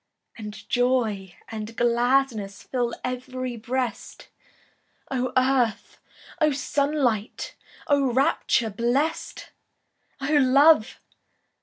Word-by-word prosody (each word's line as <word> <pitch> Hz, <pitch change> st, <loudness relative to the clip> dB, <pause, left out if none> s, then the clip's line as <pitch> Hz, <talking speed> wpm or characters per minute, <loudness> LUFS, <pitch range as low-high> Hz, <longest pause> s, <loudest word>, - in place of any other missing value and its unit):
And 210 Hz, -1 st, -9 dB
joy 230 Hz, -7 st, 0 dB
and 220 Hz, 0 st, -7 dB
gladness 240 Hz, -4 st, +1 dB
Fill 245 Hz, -2 st, -2 dB
ev'ry 255 Hz, 0 st, -4 dB
breast! 245 Hz, +1 st, -4 dB, 0.8 s
Oh 255 Hz, -1 st, -1 dB
earth! 255 Hz, -4 st, +1 dB, 0.4 s
oh 305 Hz, -2 st, +3 dB
sunlight! 275 Hz, -6 st, -1 dB, 0.3 s
Oh 280 Hz, -3 st, +2 dB
rapture 260 Hz, -4 st, +1 dB
blest! 245 Hz, +9 st, -1 dB, 0.7 s
Oh 285 Hz, +3 st, +1 dB
love! 275 Hz, -1 st, +5 dB
250 Hz, 85 wpm, -25 LUFS, 230-270 Hz, 0.8 s, love